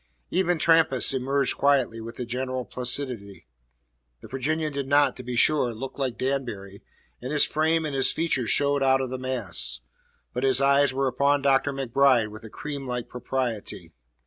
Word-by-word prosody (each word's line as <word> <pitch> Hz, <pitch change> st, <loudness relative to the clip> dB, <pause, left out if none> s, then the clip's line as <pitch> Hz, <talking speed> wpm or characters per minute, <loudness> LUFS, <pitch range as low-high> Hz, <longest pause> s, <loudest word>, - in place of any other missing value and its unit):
Even 180 Hz, -1 st, +1 dB
Trampas 160 Hz, -6 st, +3 dB
merged 135 Hz, +1 st, 0 dB
quietly 135 Hz, -5 st, +1 dB
with 115 Hz, +1 st, -8 dB
the 125 Hz, -, -5 dB
general 130 Hz, +1 st, -4 dB
placidity. 120 Hz, -, -2 dB, 0.8 s
The -, -, -11 dB
Virginian 155 Hz, +3 st, -2 dB
did 140 Hz, -1 st, -4 dB
not, 145 Hz, +1 st, +3 dB
to -, -, -7 dB
be 125 Hz, 0 st, -5 dB
sure, 125 Hz, -2 st, +3 dB
look 135 Hz, +5 st, -8 dB
like 130 Hz, -3 st, -2 dB
Danbury, 120 Hz, -8 st, -4 dB, 0.4 s
and 125 Hz, +3 st, -5 dB
his 150 Hz, -1 st, +4 dB
frame 160 Hz, +1 st, 0 dB
and 150 Hz, -, -4 dB
his 135 Hz, -1 st, +3 dB
features 145 Hz, -8 st, -1 dB
showed 140 Hz, 0 st, +2 dB
out 135 Hz, 0 st, +3 dB
of 130 Hz, -1 st, -4 dB
the 130 Hz, -, -4 dB
mass; 100 Hz, -, +1 dB, 0.5 s
but -, -, -3 dB
his 135 Hz, -1 st, +4 dB
eyes 140 Hz, 0 st, +3 dB
were 135 Hz, +1 st, -1 dB
upon 140 Hz, +2 st, +1 dB
Dr. 140 Hz, +1 st, +2 dB
MacBride 135 Hz, -3 st, +2 dB
with 110 Hz, +2 st, -11 dB
a 110 Hz, -, -9 dB
creamlike 135 Hz, -3 st, -6 dB
propriety. 125 Hz, -3 st, -4 dB
135 Hz, 170 wpm, -25 LUFS, 125-140 Hz, 0.8 s, his